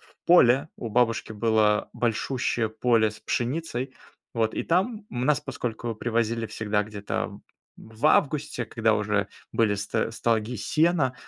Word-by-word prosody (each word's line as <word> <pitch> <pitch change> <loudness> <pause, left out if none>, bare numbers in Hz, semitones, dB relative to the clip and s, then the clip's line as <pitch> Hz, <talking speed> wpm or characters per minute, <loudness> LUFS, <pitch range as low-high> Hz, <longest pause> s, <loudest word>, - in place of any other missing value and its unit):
в - - -25
поле. 135 -6 +5
У 115 - -5
бабушки 115 -1 +1
было 110 -1 +2
большущее 120 0 -1
поле 110 0 +2
с 110 - -12
пшеницей, 130 +2 -2 0.4
вот 110 -1 0
и - - -1
там 205 +5 0
у 120 - -5
нас, 150 0 +3
поскольку 120 -4 -4
привозили 115 0 -1
всегда 105 -1 -1
где-то 105 -1 -4 0.4
в 110 +6 -3
августе, 145 -5 +2
когда 110 0 +1
уже 105 -1 0 0.2
были 110 -3 +2
ст 110 +3 -2
стоги 115 +1 0
сена, 155 - +1
115 Hz, 140 wpm, -26 LUFS, 110-130 Hz, 0.4 s, поле